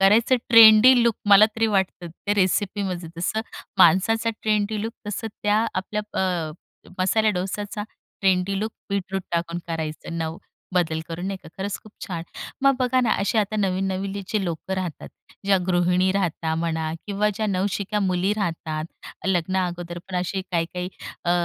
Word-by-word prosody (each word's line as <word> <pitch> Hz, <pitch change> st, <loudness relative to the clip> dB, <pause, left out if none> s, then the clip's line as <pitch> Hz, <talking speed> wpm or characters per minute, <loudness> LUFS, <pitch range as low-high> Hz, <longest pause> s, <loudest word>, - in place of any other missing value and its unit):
करायचं 220 Hz, +6 st, +5 dB
trendy 230 Hz, +2 st, +9 dB
look 235 Hz, -1 st, +3 dB
मला 205 Hz, +1 st, +8 dB
तरी 225 Hz, 0 st, +2 dB
वाटतं 190 Hz, -4 st, 0 dB
त्या 200 Hz, +5 st, -3 dB
रेसिपीमध्ये. 190 Hz, -2 st, 0 dB
जसं 180 Hz, +6 st, -1 dB, 0.4 s
माणसाचा 210 Hz, +6 st, +4 dB
ट्रेंडी 215 Hz, 0 st, +1 dB
लूक 225 Hz, +1 st, -3 dB, 0.2 s
तसं 210 Hz, +2 st, -3 dB, 0.2 s
त्या 210 Hz, +2 st, +3 dB
आपल्या 210 Hz, +3 st, -2 dB, 0.2 s
अ, 175 Hz, -4 st, -1 dB, 0.5 s
मसाल्या 215 Hz, +4 st, +3 dB
डोस्याचा 200 Hz, +3 st, -3 dB, 0.4 s
ट्रेंडी 190 Hz, 0 st, +2 dB
लूक 220 Hz, +1 st, -2 dB, 0.2 s
बीटरूट 195 Hz, -1 st, -2 dB
टाकून 170 Hz, 0 st, -1 dB
करायचं. 160 Hz, 0 st, -4 dB
नव 160 Hz, 0 st, -3 dB, 0.4 s
बदल 160 Hz, -3 st, +1 dB
करून 170 Hz, +2 st, -4 dB
नाही 195 Hz, 0 st, -2 dB
का, -, -, -12 dB
खरंच 200 Hz, +1 st, -3 dB
खूप 215 Hz, -, -15 dB
छान. 170 Hz, -3 st, -4 dB, 0.4 s
मग 275 Hz, 0 st, +5 dB
बघा 255 Hz, 0 st, +3 dB
ना 235 Hz, -, +2 dB
असे 205 Hz, +3 st, +1 dB
आता 215 Hz, 0 st, 0 dB
नवीन 195 Hz, -2 st, 0 dB
नवीलीची 195 Hz, +2 st, -2 dB
लोकं 170 Hz, +2 st, -4 dB
राहतात, 185 Hz, -4 st, -4 dB, 0.4 s
ज्या 200 Hz, -1 st, +5 dB
गृहिणी 180 Hz, +1 st, +2 dB
राहता 170 Hz, -4 st, -1 dB
म्हणा 160 Hz, -1 st, -1 dB
किंवा 205 Hz, +1 st, +1 dB
ज्या 215 Hz, +2 st, -1 dB
नवशिक्या 200 Hz, +1 st, -1 dB
मुली 185 Hz, 0 st, +1 dB
राहतात, 160 Hz, -5 st, -2 dB, 0.4 s
लग्ना 185 Hz, 0 st, +1 dB
अगोदर 175 Hz, 0 st, -6 dB
पण 185 Hz, -, -3 dB
असे 185 Hz, +2 st, -2 dB
काही-काही 175 Hz, +1 st, -1 dB, 0.4 s
अ, 170 Hz, -, +1 dB
190 Hz, 155 wpm, -24 LUFS, 175-210 Hz, 0.5 s, ट्रेंडी